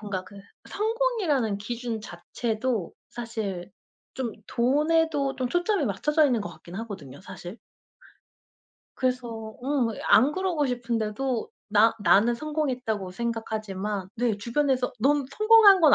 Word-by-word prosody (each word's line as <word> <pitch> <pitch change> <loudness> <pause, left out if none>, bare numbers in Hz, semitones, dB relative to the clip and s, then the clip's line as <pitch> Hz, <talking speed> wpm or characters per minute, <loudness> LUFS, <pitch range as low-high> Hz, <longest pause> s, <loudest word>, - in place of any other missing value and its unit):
뭔가 195 -3 -4
그 200 - -14 0.3
성공이라는 420 - 0
기준 230 +2 -4
자체도 220 +2 -3 0.2
사실 210 -6 -5 0.4
좀 250 -4 -3
돈에도 290 +2 +2
좀 255 -1 -1
초점이 350 - +1
맞춰져 300 - +2
있는 245 -5 +1
것 205 - -4
같긴 175 - -12
하거든요 190 - -7
사실. 190 +2 -9 1.4
그래서 235 -4 -2
음 265 -3 +1
어 - - -3 0.2
안 225 +8 +6
그러고 350 -5 0
싶은데도 240 0 -2 0.2
나 220 +2 +5
나는 220 +4 +5
성공했다고 250 -9 -2
생각하지만 215 -3 -3
네 235 -3 +1
주변에서 255 +3 0
"넌 285 +3 +3
성공한 430 +2 +7
건 310 -4 +7
240 Hz, 275 characters per minute, -26 LUFS, 210-290 Hz, 1.4 s, 성공한